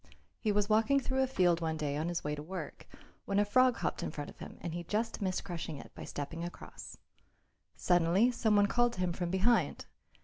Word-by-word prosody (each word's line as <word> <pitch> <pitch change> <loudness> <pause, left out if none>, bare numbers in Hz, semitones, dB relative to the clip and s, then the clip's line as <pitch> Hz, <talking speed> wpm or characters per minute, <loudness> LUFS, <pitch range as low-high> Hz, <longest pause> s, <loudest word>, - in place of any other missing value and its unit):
He 215 - +1
was 205 0 +1
walking 225 +6 +4
through 265 0 0
a 265 - +2
field 175 -9 +2
one 160 -1 -1
day 145 -2 -2
on 155 +3 -1
his 175 - -2
way 150 - -2
to 145 - -4
work, 170 0 -7 0.4
when 200 - 0
a 205 - +4
frog 255 +3 +4
hopped - - -2
in - - -2
front 145 -1 -6
of - - -20
him - - -9
and 170 -2 -4
he 175 0 -4
just 220 +5 -2
missed 185 -2 -1
crushing 165 -5 -5
it - - -11
by - - -8
stepping 160 +4 -5
across. 175 - -8 0.8
Suddenly 175 +7 +3
some 220 -3 +2
one 205 0 +6
called 240 +3 +2
to - - -8
him 180 -1 0
from 175 0 -3
behind. 195 +6 +2
185 Hz, 225 wpm, -32 LUFS, 165-220 Hz, 0.8 s, one